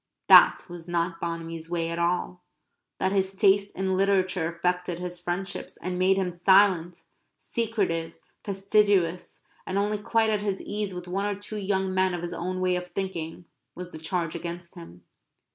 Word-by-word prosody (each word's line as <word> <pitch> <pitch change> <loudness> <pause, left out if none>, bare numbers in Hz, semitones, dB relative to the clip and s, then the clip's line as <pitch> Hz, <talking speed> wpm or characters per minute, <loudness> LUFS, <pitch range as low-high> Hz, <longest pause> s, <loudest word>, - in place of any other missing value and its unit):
That - - +8
was 175 -2 -9
not 170 0 -1
Bonamy's 165 -1 -5
way 165 -1 -1
at 170 - -3
all. 180 +1 -1 0.6
That 190 - 0
his 195 -1 0
taste 200 0 +3
in 190 0 0
literature 185 -3 +1
affected 180 0 -1
his 180 0 -6
friendships, 180 +3 -4
and 180 +1 -4
made 190 +1 +4
him 185 -2 -1
silent, 180 -1 +3 0.3
secretive, 205 -8 -2 0.3
fastidious, 195 -3 +1 0.2
and 190 - -2
only 205 +1 0
quite 220 +1 +1
at 210 -1 0
his 200 -2 -2
ease 205 -2 -4
with 180 0 -7
one 195 +3 -1
or 205 - -1
two 205 +2 -6
young 190 -1 -1
men 185 -1 +2
of 175 - -6
his 175 0 -4
own 185 +2 -3
way 185 -1 +2
of 180 0 -5
thinking, 175 -3 -5 0.3
was 180 0 -7
the 155 - -8
charge 165 0 -2
against 170 0 -6
him. 85 +1 -12
180 Hz, 170 wpm, -26 LUFS, 170-195 Hz, 0.6 s, That